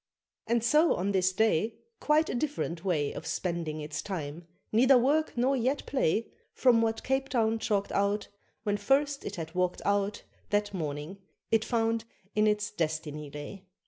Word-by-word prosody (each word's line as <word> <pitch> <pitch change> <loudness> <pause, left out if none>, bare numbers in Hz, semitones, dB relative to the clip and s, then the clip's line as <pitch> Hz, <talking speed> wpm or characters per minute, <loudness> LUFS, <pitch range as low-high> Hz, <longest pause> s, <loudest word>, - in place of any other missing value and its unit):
And 235 0 +2
so 305 +7 +4
on 195 +3 -1
this 190 -1 +2
day 220 +1 +1 0.2
Quite 305 +1 +3
a - - -3
different 240 - -2
way 155 -7 0
Of 165 - -7
spending 160 -1 -2
its 150 0 -4
time 165 -3 -5 0.2
neither 255 +4 +6
work 285 +4 +2
nor 260 +3 +3
yet 260 +3 0
play 230 - 0 0.2
From 240 -3 +4
what 225 0 0
Cape 265 +1 0
Town 225 -2 +1
chalked 200 -2 0
out 200 +1 +1 0.4
When 205 -1 0
first 275 +7 +1
it 205 - -5
had 165 -2 -6
walked 180 0 0
out 200 0 0 0.3
That 205 0 0
morning, 155 +2 -4 0.3
it 225 -1 +4
found 225 -1 0 0.3
in 215 0 +3
its 210 0 +1
destiny 155 -4 -3
lay. 165 +7 -9
205 Hz, 165 wpm, -29 LUFS, 170-235 Hz, 0.4 s, neither